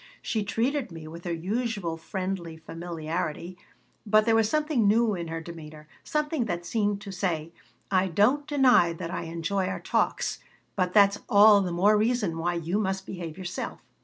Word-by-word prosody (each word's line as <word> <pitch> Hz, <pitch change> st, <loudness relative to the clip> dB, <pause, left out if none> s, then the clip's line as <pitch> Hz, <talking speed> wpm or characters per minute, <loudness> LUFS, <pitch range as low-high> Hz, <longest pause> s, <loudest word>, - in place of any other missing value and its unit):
She 220 Hz, -2 st, -1 dB
treated 240 Hz, +4 st, -1 dB
me 160 Hz, -1 st, -9 dB
with 170 Hz, +3 st, -10 dB
her 175 Hz, -, -2 dB
usual 195 Hz, 0 st, -2 dB
friendly 185 Hz, -1 st, -4 dB
familiarity, 165 Hz, +1 st, -5 dB, 0.5 s
but 215 Hz, 0 st, +4 dB
there 225 Hz, -, +3 dB
was 225 Hz, -1 st, +3 dB
something 300 Hz, -8 st, +1 dB
new 220 Hz, +1 st, +3 dB
in 170 Hz, -3 st, -4 dB
her 165 Hz, 0 st, -4 dB
demeanor, 155 Hz, -2 st, -10 dB, 0.2 s
something 300 Hz, -4 st, -1 dB
that 175 Hz, -4 st, -3 dB
seemed 205 Hz, 0 st, 0 dB
to 200 Hz, -, -7 dB
say, 170 Hz, -4 st, -2 dB, 0.4 s
"I 190 Hz, 0 st, +3 dB
don't 235 Hz, -, +2 dB
deny 255 Hz, -, +4 dB
that 165 Hz, 0 st, -6 dB
I -, -, -4 dB
enjoy 170 Hz, +4 st, -2 dB
our -, -, -3 dB
talks, -, -, 0 dB, 0.4 s
but 180 Hz, -1 st, -1 dB
that's 200 Hz, -1 st, +5 dB
all 205 Hz, 0 st, +7 dB
the 180 Hz, -2 st, -2 dB
more 195 Hz, +5 st, +4 dB
reason 215 Hz, -7 st, 0 dB
why 175 Hz, +1 st, 0 dB
you 170 Hz, +4 st, -1 dB
must 190 Hz, -2 st, -2 dB
behave 170 Hz, -3 st, -7 dB
yourself." 180 Hz, -1 st, -5 dB
190 Hz, 170 wpm, -27 LUFS, 170-215 Hz, 0.5 s, all